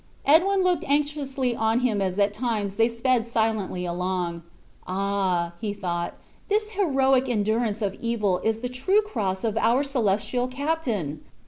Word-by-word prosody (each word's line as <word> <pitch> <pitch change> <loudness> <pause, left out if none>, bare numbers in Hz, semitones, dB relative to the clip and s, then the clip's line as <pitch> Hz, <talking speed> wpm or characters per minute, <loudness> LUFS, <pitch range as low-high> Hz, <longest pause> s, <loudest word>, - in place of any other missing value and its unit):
Edwin 375 +6 +4
looked 365 -1 +2
anxiously 280 -3 0
on 225 +2 +1
him 220 -5 +1
as 190 -1 -1
at 200 0 +2
times 215 -3 -2
they 225 +1 +4
sped 235 +1 +1
silently 220 -5 -1
along: 175 -1 -2 0.5
"Ah!" 190 -2 0 0.3
thought 175 -2 -2 0.3
he, 410 - +3
"this 430 0 0
heroic 270 -10 +2
endurance 220 0 0
of 195 -2 0
evil 210 -6 0
is 225 0 -1
the 250 - -2
true 375 +13 +2
cross 195 - -2
of 220 -1 0
our 240 +5 +3
celestial 245 -2 0
Captain! 255 - -2
225 Hz, 145 wpm, -25 LUFS, 200-270 Hz, 0.5 s, Edwin